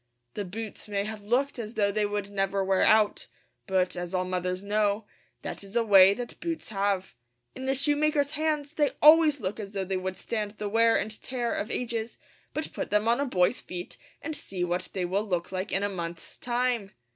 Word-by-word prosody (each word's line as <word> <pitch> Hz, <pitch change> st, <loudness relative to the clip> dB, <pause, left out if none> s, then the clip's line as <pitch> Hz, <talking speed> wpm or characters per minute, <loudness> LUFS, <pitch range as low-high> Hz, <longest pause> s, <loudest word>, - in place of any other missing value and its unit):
The 205 Hz, -, -3 dB
boots 215 Hz, +4 st, -7 dB
may 200 Hz, -1 st, -1 dB
have 215 Hz, 0 st, -6 dB
looked 245 Hz, +6 st, 0 dB
as 225 Hz, +1 st, -6 dB
though 200 Hz, -1 st, +2 dB
they 210 Hz, 0 st, +1 dB
would 205 Hz, -1 st, -3 dB
never 195 Hz, 0 st, 0 dB
wear 190 Hz, -1 st, +2 dB
out; 215 Hz, -1 st, +4 dB, 0.4 s
but, 185 Hz, -2 st, +1 dB
as 175 Hz, +1 st, -4 dB
all 185 Hz, 0 st, +1 dB
mothers 185 Hz, +1 st, -2 dB
know, 205 Hz, +1 st, +1 dB, 0.4 s
that -, -, -5 dB
is 200 Hz, +2 st, -12 dB
a 235 Hz, -, +3 dB
way 195 Hz, -2 st, +7 dB
that 245 Hz, +1 st, -7 dB
boots 335 Hz, -1 st, -4 dB
have. 195 Hz, -2 st, -1 dB, 0.4 s
In 260 Hz, -, -7 dB
the 270 Hz, +1 st, +1 dB
shoemaker's 290 Hz, +1 st, +2 dB
hands 305 Hz, -1 st, -1 dB
they 295 Hz, -2 st, +1 dB
always 305 Hz, -1 st, +7 dB
look 205 Hz, -1 st, -3 dB
as 205 Hz, -1 st, -7 dB
though 195 Hz, -1 st, -2 dB
they 190 Hz, 0 st, -1 dB
would 185 Hz, 0 st, -4 dB
stand 210 Hz, -3 st, -3 dB
the 210 Hz, -, -3 dB
wear 230 Hz, +2 st, +4 dB
and 215 Hz, 0 st, -4 dB
tear 245 Hz, -2 st, -2 dB
of 215 Hz, -, -3 dB
ages; 230 Hz, -2 st, -3 dB, 0.3 s
but 310 Hz, -, -4 dB
put -, -, -4 dB
them 210 Hz, +1 st, +2 dB
on 235 Hz, +3 st, +3 dB
a 285 Hz, -, +1 dB
boy's 180 Hz, 0 st, +2 dB
feet 180 Hz, 0 st, -7 dB, 0.3 s
and 315 Hz, -, -2 dB
see 185 Hz, -9 st, -4 dB
what 180 Hz, +1 st, -1 dB
they 185 Hz, -2 st, -1 dB
will 190 Hz, +4 st, 0 dB
look 180 Hz, -5 st, -2 dB
like 190 Hz, +2 st, -3 dB
in 195 Hz, -, +1 dB
a -, -, +2 dB
month's 170 Hz, -4 st, -6 dB
time! 240 Hz, -4 st, 0 dB
210 Hz, 210 wpm, -28 LUFS, 190-245 Hz, 0.4 s, way